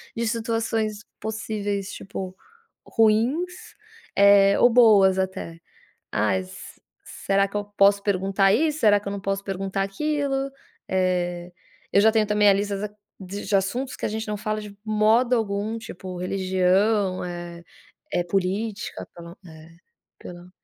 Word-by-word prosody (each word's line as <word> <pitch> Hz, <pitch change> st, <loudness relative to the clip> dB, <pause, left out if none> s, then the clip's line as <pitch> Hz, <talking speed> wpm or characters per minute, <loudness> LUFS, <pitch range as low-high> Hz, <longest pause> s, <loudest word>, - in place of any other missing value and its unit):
de 230 Hz, 0 st, -1 dB
situações 225 Hz, -2 st, -2 dB, 0.2 s
possíveis, 205 Hz, -2 st, -3 dB
tipo 190 Hz, -1 st, -7 dB, 0.5 s
ruins, 245 Hz, +12 st, 0 dB, 0.4 s
eh, 200 Hz, 0 st, +6 dB
ou 245 Hz, -, +6 dB
boas 210 Hz, -6 st, +5 dB
até. 185 Hz, -3 st, -4 dB, 0.5 s
“Ai, 95 Hz, -1 st, +1 dB
se 95 Hz, 0 st, -12 dB, 0.2 s
será 195 Hz, 0 st, 0 dB
que 200 Hz, -, -15 dB
eu 205 Hz, -, -3 dB
posso 200 Hz, 0 st, +5 dB
perguntar 195 Hz, 0 st, +2 dB
isso? 305 Hz, +4 st, +1 dB
Será 205 Hz, -2 st, +5 dB
que 200 Hz, -, -10 dB
eu -, -, -2 dB
não 200 Hz, -1 st, -5 dB
posso 195 Hz, 0 st, -2 dB
perguntar 195 Hz, 0 st, -3 dB
aquilo?”. 275 Hz, +5 st, -1 dB, 0.4 s
Eh, 180 Hz, -1 st, -1 dB, 0.4 s
eu 200 Hz, -, +6 dB
já 220 Hz, +1 st, +5 dB
tenho 220 Hz, -1 st, +2 dB
também 210 Hz, -1 st, +4 dB
a -, -, +6 dB
lista 200 Hz, 0 st, -1 dB
da 210 Hz, +1 st, -4 dB, 0.3 s
de 200 Hz, +2 st, -3 dB
assuntos 240 Hz, +8 st, -1 dB
que -, -, -5 dB
a -, -, 0 dB
gente 220 Hz, +1 st, -4 dB
não 210 Hz, -, -2 dB
fala 215 Hz, 0 st, -3 dB
de 205 Hz, -1 st, -11 dB
modo 220 Hz, +4 st, +3 dB
algum. 215 Hz, 0 st, -2 dB
Tipo, 185 Hz, -3 st, -8 dB
religião, 190 Hz, +2 st, +1 dB
eh 175 Hz, -1 st, -7 dB, 0.5 s
eh, 175 Hz, -, +1 dB
política. 200 Hz, +4 st, -2 dB
Pelo, 170 Hz, +1 st, -11 dB
eh, 160 Hz, 0 st, -14 dB, 0.4 s
pelo 175 Hz, 0 st, -11 dB
200 Hz, 145 wpm, -24 LUFS, 190-220 Hz, 0.5 s, eh